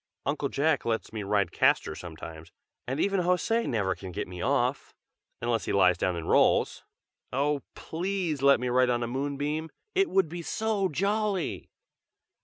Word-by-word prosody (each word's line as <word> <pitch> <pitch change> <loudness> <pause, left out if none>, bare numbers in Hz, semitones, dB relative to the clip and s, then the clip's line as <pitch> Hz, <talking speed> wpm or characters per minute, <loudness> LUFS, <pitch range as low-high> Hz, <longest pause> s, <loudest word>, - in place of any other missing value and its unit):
Uncle 140 0 -1
Jack 145 +1 +1
lets 115 -1 -2
me 110 - -3
ride 100 -3 +1
Castor 80 - +2
sometimes, 80 -1 -9 0.4
and 130 +4 -2
even 195 +1 +2
José 180 +6 +1
never 100 -5 0
can 95 -2 -9
get 100 +4 -4
me 90 -1 -7
off, - - 0 0.5
unless 115 -2 0
he - - -2
lies 90 -2 +5
down 90 +1 0
and 85 -1 -5
rolls! - - +3 0.5
oh! 140 +2 +1
please 175 -3 -2
let 140 0 +6
me 125 - -2
ride 125 +1 +3
on 120 -1 +1
a - - -2
moonbeam! 145 +5 -2 0.2
it 390 0 +2
would 190 -3 +3
be 170 +2 -6
so 210 +1 0
jolly!" 200 +2 -1
140 Hz, 165 wpm, -28 LUFS, -, 0.5 s, let